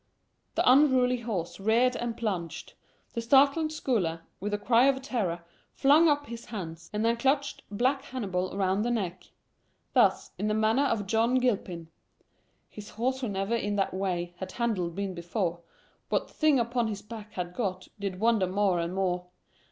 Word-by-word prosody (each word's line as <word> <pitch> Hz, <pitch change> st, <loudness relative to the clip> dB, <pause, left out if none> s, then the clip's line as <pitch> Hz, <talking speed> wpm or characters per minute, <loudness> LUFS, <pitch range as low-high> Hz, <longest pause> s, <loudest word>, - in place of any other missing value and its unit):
The -, -, +1 dB
unruly 255 Hz, -2 st, +5 dB
horse 205 Hz, -8 st, -4 dB
reared 230 Hz, +5 st, +3 dB
and 235 Hz, -1 st, -3 dB
plunged. 175 Hz, -8 st, -4 dB, 0.4 s
The 230 Hz, -, -2 dB
startled 280 Hz, +6 st, +4 dB
scholar, 195 Hz, -, -1 dB, 0.2 s
with 205 Hz, +2 st, -3 dB
a 205 Hz, -, 0 dB
cry 235 Hz, +4 st, +4 dB
of 270 Hz, -1 st, +3 dB
terror, 190 Hz, -, -2 dB, 0.3 s
flung 300 Hz, +4 st, +5 dB
up 290 Hz, 0 st, +1 dB
his 235 Hz, -2 st, -8 dB
hands, 170 Hz, -7 st, -7 dB
and 210 Hz, +1 st, -1 dB
then 230 Hz, +1 st, +2 dB
clutched 275 Hz, +4 st, 0 dB
black 255 Hz, +7 st, +1 dB
Hannibal 190 Hz, -9 st, -3 dB
around 195 Hz, 0 st, +1 dB
the 235 Hz, -, 0 dB
neck. 190 Hz, -7 st, -2 dB, 0.7 s
Thus, -, -, +3 dB
in 210 Hz, -, 0 dB
the 215 Hz, -, +1 dB
manner 220 Hz, +6 st, +3 dB
of 225 Hz, -6 st, 0 dB
John 225 Hz, +4 st, +2 dB
Gilpin, 195 Hz, -10 st, -1 dB, 0.8 s
"His 210 Hz, -1 st, -10 dB
horse, 260 Hz, +4 st, -2 dB
who 245 Hz, -, -2 dB
never 195 Hz, +3 st, -1 dB
in 205 Hz, -3 st, -1 dB
that 195 Hz, -1 st, 0 dB
way 180 Hz, -2 st, -2 dB
Had 190 Hz, -1 st, -6 dB
handled 195 Hz, -8 st, -1 dB
been 200 Hz, -1 st, -3 dB
before, 175 Hz, 0 st, -2 dB, 0.5 s
What -, -, -1 dB
thing 305 Hz, -3 st, +3 dB
upon 235 Hz, 0 st, 0 dB
his 205 Hz, -2 st, -5 dB
back 215 Hz, -1 st, -9 dB
had 180 Hz, -1 st, -4 dB
got 185 Hz, -5 st, -3 dB
Did 195 Hz, -2 st, -4 dB
wonder 220 Hz, -3 st, +3 dB
more 190 Hz, -1 st, +1 dB
and 170 Hz, +2 st, -2 dB
more. 180 Hz, -2 st, -1 dB
215 Hz, 170 wpm, -28 LUFS, 185-245 Hz, 0.8 s, unruly